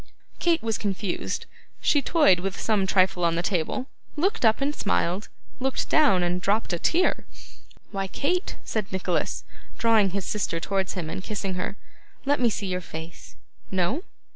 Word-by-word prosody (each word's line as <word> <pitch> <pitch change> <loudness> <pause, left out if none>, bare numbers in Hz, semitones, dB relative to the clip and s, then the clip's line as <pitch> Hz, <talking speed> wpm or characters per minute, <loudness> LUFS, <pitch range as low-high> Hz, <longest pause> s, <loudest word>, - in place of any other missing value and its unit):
Kate 335 -4 +2
was 225 -2 -1
confused; 200 -2 -2 0.3
she 290 - +3
toyed 285 - +5
with 195 +1 -3
some 205 -4 +1
trifle 185 -2 +3
on 170 -1 +3
the 170 - 0
table, 180 +7 -1 0.3
looked 380 - +1
up 220 -1 +5
and 280 +2 0
smiled, 195 0 0 0.3
looked 265 0 -1
down 280 - +5
and 175 +1 0
dropped 200 0 +1
a 170 - -1
tear. 350 - +2 0.7
'Why, 195 -1 -2
Kate,' 355 - -1
said 215 -3 -2
Nicholas, 185 -2 -1 0.3
drawing 225 -4 +4
his 195 0 -3
sister 195 -5 -1
towards 190 +2 -1
him 180 -4 -4
and 170 - -4
kissing 200 -3 -3
her, 185 +2 -3 0.5
'let 285 +1 +2
me 240 -2 +4
see 205 -1 -3
your 180 -1 -2
face. 160 0 -9 0.3
No? 190 - +1
195 Hz, 165 wpm, -26 LUFS, 180-240 Hz, 0.7 s, toyed